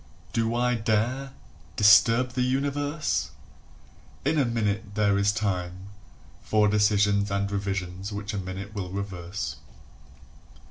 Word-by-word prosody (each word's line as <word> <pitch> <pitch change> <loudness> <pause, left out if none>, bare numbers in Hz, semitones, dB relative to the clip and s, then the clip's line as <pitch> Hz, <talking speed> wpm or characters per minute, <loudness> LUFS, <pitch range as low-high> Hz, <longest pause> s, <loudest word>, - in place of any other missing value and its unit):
"] - - -26
Do 115 0 0
I 125 +1 +2
dare 120 +4 -1 0.4
Disturb 115 +4 +5
the 125 +1 -2
universe? 145 +4 -1 1.0
In 150 +2 +2
a 140 - +3
minute 105 -3 -2
there 100 -1 +3
is 100 0 +3
time 95 -3 -3 0.5
For 105 -1 +2
decisions 105 -1 +3
and 100 0 -1
revisions 95 -1 -3
which 105 +1 -5
a 100 - -2
minute 95 +2 -6
will 95 -4 -4
reverse. 95 -1 -5
105 Hz, 125 wpm, -26 LUFS, 100-115 Hz, 1.0 s, Disturb